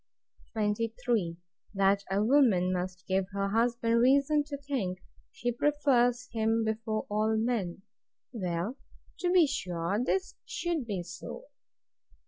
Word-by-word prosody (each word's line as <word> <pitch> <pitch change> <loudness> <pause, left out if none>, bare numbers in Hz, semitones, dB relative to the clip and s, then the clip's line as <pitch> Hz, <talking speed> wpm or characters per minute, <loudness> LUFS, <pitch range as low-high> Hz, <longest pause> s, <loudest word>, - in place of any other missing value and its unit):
23. 220 -3 0 0.4
That 195 +1 +3
a 195 +2 +1
woman 215 -8 +4 0.3
give 190 0 +1
her 200 0 0
husband 235 +1 +2
reason 280 +4 +4
to 285 -1 -5
think 265 -10 -2 0.3
she 245 - -2
prefers 250 -2 +2
him 225 0 +1
before 220 0 -2
all 215 +1 +1
men. 220 -6 -1 0.5
Well, 185 +3 -2 0.4
to 355 -1 +1
be 360 -3 +6
sure 185 - -1
this 375 +8 0
should 335 -8 -2
be 195 -5 -2
so. 175 0 -8
225 Hz, 115 wpm, -30 LUFS, 195-255 Hz, 0.5 s, be